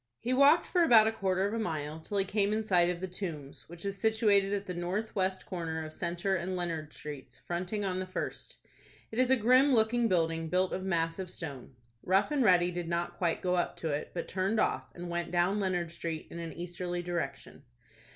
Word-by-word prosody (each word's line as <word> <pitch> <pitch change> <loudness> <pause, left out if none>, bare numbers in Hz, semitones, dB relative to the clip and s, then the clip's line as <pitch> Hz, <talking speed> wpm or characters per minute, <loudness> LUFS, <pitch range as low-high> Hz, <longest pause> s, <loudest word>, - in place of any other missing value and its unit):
He 245 +2 -1
walked 280 +5 +6
for 355 - +1
about 225 -6 +6
quarter 190 -3 0
of 205 - -4
a 230 - -1
mile, 155 -6 -3
till 200 +5 -3
he 195 - +3
came 200 +1 +1
in 220 0 -1
sight 175 -4 +4
of 175 -1 -3
the 190 - -2
Tombs, 165 -8 -6
which 175 +2 -10
is 195 -1 -4
situated 210 -3 +3
at 200 0 -1
the 185 - -4
north 185 +6 -3
west 190 -1 0
corner 160 -3 -4
of 155 - -9
Centre 175 +4 -1
and 185 +1 -2
Leonard 165 -4 -3
Streets, 145 -3 -9
fronting 185 +4 -2
on 185 -1 -1
the 185 - -4
first. 185 - -5 0.5
It 225 - -3
is 255 0 +3
a 265 - +7
grim 255 +4 +5
looking 230 +1 +3
building, 165 -4 0
built 185 +1 +1
of 185 - -3
massive 170 0 -1
stone. 140 -7 -7 0.3
Rough 195 +8 +2
and 285 -3 +2
Ready 180 -4 +4
did 175 -1 -4
not 170 +1 -1
quite 170 -1 -1
go 180 -1 +1
up 175 -1 0
to 160 - -1
it, 145 0 -2
but 170 - -3
turned 195 +4 0
off, - - 0
and 175 0 -6
went 175 0 -2
down 180 +4 +2
Leonard 180 -4 -1
Street 165 -2 -5
in 170 - -6
an 165 -1 -5
easterly 175 0 -4
direction. 170 -6 -4
180 Hz, 215 wpm, -31 LUFS, 170-205 Hz, 0.5 s, a